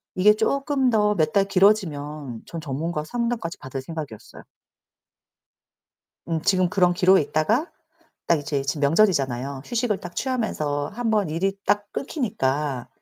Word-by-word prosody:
이게 205 +3 +6
쪼끔 275 +2 +1
더 210 -1 +3
몇 155 -3 +1
달 200 -1 +4
길어지면 155 - +1
전 165 - -7
전문가 155 +2 -3
상담까지 235 -2 -3
받을 130 -1 -6
생각이었어요. 150 -6 -8 1.8
음 165 -1 0
지금 185 -1 +3
그런 180 -1 +3
기로에 185 0 +5
있다가 210 - 0 0.6
딱 170 -2 +3
이제 145 -1 -2
지금 145 +2 -2
명절이잖아요. 140 - +2
휴식을 235 -4 -1
딱 175 0 -9
취하면서 155 - -1
한번 220 -5 0
일이 185 +5 0
딱 205 0 +1
끊기니까 145 - -2
175 Hz, 305 characters per minute, -24 LUFS, 145-210 Hz, 1.8 s, 이게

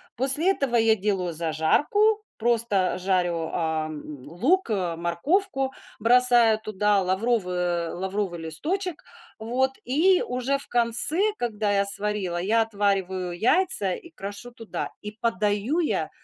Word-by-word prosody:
После 275 +9 +4
этого 275 -9 -2
я 225 -1 +4
делаю 190 -4 -2
зажарку, 290 - +1
просто 220 -5 0
жарю, 175 -3 -1
ам, 155 -2 -3 0.2
лук, 250 - 0
э, 180 -5 -1
морковку, 270 - -1 0.3
бросаю 240 -1 +5
туда 210 -2 0
лавровый 190 0 -1
э, 175 -2 -1
лавровый 190 -1 -3
листочек, 325 - -4 0.3
вот, 250 +4 -1
и 345 +9 +2
уже 255 +3 -1
в 275 - -6
конце, 240 +8 +4 0.2
когда 215 -3 -2
я 200 0 +1
сварила, 200 -3 0
я 225 +4 +2
отвариваю 190 -4 -2
яйца 225 - +3
и 340 - -9
крошу 205 -2 -7
туда, 230 -2 -6
и 210 - -7
подаю 220 +5 -1
я 325 - -1
210 Hz, 125 wpm, -24 LUFS, 185-250 Hz, 0.3 s, бросаю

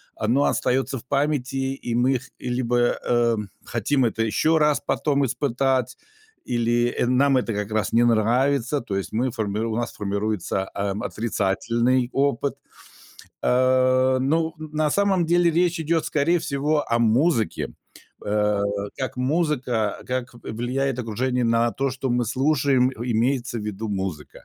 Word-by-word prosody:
оно 125 +6 +1
остается 135 +1 0
в 115 - -11
памяти, 135 -1 -1
и 120 -3 -4
мы 125 +1 +2
х 130 - -16
либо, 120 -1 -1 0.3
э, 120 -1 +3 0.3
хотим 125 +3 0
это 115 0 0
еще 155 +9 +2
раз 150 -1 +3
потом 140 -2 +1
испытать 130 -1 0 0.5
или 120 0 +1
нам 135 +1 +3
это 120 -3 -1
как 105 +1 -3
раз 110 -1 -1
не 120 +1 +5
нравится. 125 +5 +2
То 100 -4 -4
есть 95 - -4
мы 125 +3 0
формируем 110 -1 -2
у - - -2
нас 120 -1 -3
формируется, 100 -1 -2
ам, 100 +1 -2
отрицательный 120 +2 0
опыт. 140 0 0 0.9
А, 130 +1 +3
ну, 160 +5 +1
на 155 -1 -1
самом 195 -2 +2
деле 175 +1 +3
речь 175 +1 +1
идет, 160 +1 0
скорее 165 +4 +2
всего, 145 +2 0
о 115 - +3
музыке, 115 +2 +1 0.5
э, 105 -1 +1 0.4
как 130 -1 -3
музыка 130 -6 0
как 125 -1 -3
в - - -13
влияет 125 +3 -2
окружение 125 +2 -1
на 115 0 +2
то, 135 0 -1
что 130 0 -3
мы 120 0 +1
слушаем, 130 +1 +2
имеется 120 +1 -1
в - - -5
виду 105 +1 -4
музыка. 95 -7 -5
125 Hz, 145 wpm, -23 LUFS, 115-140 Hz, 0.9 s, не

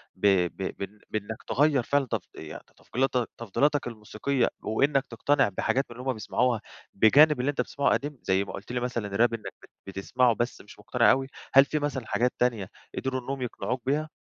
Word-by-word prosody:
ب - - +2 0.2
ب 95 - -8 0.2
ب 105 +2 -8
بإنك 110 +1 -4
تغيّر 145 -2 +3
فعلًا 140 +2 +1
تفض 125 - -2
يعني 75 -1 -9
تفضيلاتك- 125 -1 -1
تفضيلاتك 140 +7 +1
الموسيقية، 115 +3 -1 0.2
وإنّك 135 +5 +2
تقتنع 135 +2 +2
بحاجات 130 +7 0
من 120 - -10
اللي 125 +2 -7
هم - - +2
بيسمعوها 115 +1 0 0.3
بجانب 145 +8 +6
اللي 130 +3 +1
أنت 145 - 0
بتسمعه 140 - 0
قديم، 145 0 -2
زي 95 +1 +2
ما 100 - -8
قلت - - -8
لي 125 - -1
مثلًا 120 -5 -3
راب 115 +2 +3
إنّك 115 -2 -5
بت - - -15 0.2
بتسمعه، 115 +6 +1
بس 120 +2 -2
مش 105 - -15
مقتنع 120 +3 +3
أوي، 135 +1 +1 0.3
هل 135 +1 +8
في 150 +2 -1
مثلًا 145 -4 -2
حاجات 125 +3 +1
تانية 115 -6 0 0.3
قدروا 130 -1 -2
إنّهم 135 +2 -5
يقنعوك 125 +1 -3
بيها؟ 150 +4 0
125 Hz, 190 wpm, -27 LUFS, 110-135 Hz, 0.3 s, هل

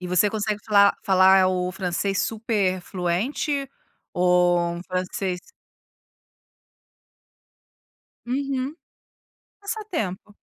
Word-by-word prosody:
E 180 - -6
você 180 +3 +3
consegue 210 0 -2
falar 200 -1 +5
falar 190 0 +5
o 180 -1 -1
francês 190 +1 -2
super 210 -4 -1
fluente 210 - -2 0.4
ou 180 0 +3
um 170 0 -6
francês 185 0 -3 2.9
Uhum. 270 +2 -2 0.9
Passatempo. 325 - -4
195 Hz, 80 wpm, -24 LUFS, 180-225 Hz, 2.9 s, falar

